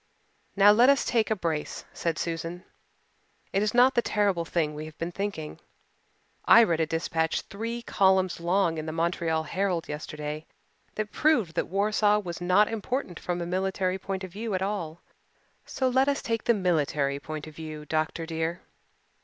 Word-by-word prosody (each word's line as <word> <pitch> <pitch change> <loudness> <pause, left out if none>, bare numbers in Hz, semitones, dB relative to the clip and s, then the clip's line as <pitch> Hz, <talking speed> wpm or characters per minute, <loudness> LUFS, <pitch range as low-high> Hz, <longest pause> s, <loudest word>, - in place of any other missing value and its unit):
"Now, 200 +1 +7
let 240 +5 +6
us 280 0 +4
take 225 -3 +1
a 220 - +2
brace," 165 -5 -3
said 165 -2 -2
Susan. 170 +1 -4 0.9
"It 195 - +2
is 210 0 +1
not 250 +2 +6
the 240 - +3
terrible 200 -7 +1
thing 160 -2 -1
we 150 +1 -6
have 155 -1 -11
been 170 +1 -3
thinking. 195 -5 -4 0.8
I 235 - +8
read 170 -7 +1
a 160 - +1
dispatch 160 0 -1
three 230 +3 -5
columns 190 -4 +2
long 170 -1 +1
in 155 - -5
the - - -2
Montreal 165 -1 0
Herald 180 +1 -1
yesterday 150 +1 -6 0.5
that 215 -1 -3
proved 245 - +2
that - - -1
Warsaw 210 +2 +2
was 180 -4 -5
not 185 +4 +4
important 225 -3 -3
from 175 -1 -3
a - - -2
military 185 +1 -1
point 190 0 -4
of 185 - -7
view 215 0 -3
at 185 - -1
all. 175 -5 -3 0.7
So 260 - -1
let 260 +2 +3
us 280 0 0
take 230 -2 -2
the 235 - +4
military 150 -7 0
point 155 0 -6
of 155 -1 -12
view, 155 -1 -7
doctor 160 +2 -1
dear." 160 +1 -3
180 Hz, 175 wpm, -27 LUFS, 160-210 Hz, 0.9 s, I